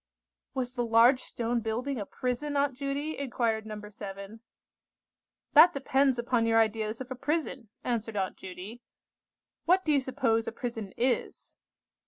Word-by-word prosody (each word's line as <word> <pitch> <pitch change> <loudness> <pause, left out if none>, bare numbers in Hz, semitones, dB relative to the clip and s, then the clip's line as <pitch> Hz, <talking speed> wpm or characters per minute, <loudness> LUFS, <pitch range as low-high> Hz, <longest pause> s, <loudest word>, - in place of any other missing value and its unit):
"Was 255 -1 -2
the 245 -2 -1
large 235 +3 +5
stone 235 0 -2
building 235 +4 -2
a 200 - -5
prison, 280 +3 -2
Aunt 280 -1 +2
Judy?" 280 +4 -3
inquired 230 -5 -1
No. 215 -1 -6
7. 200 +1 -8 1.1
"That 315 +4 +8
depends 270 -1 +2
upon 240 -1 +1
your 225 0 +4
ideas 220 +1 0
of 260 0 -8
a - - -2
prison," 270 -4 -2
answered 225 -3 -2
Aunt 190 -1 -1
Judy. 190 +5 -9 0.8
"What 370 +2 +3
do 310 - +2
you 285 -2 +4
suppose 255 -4 0
a - - -1
prison 225 -4 -5
is?" 250 +1 -1
240 Hz, 150 wpm, -29 LUFS, 225-270 Hz, 1.1 s, That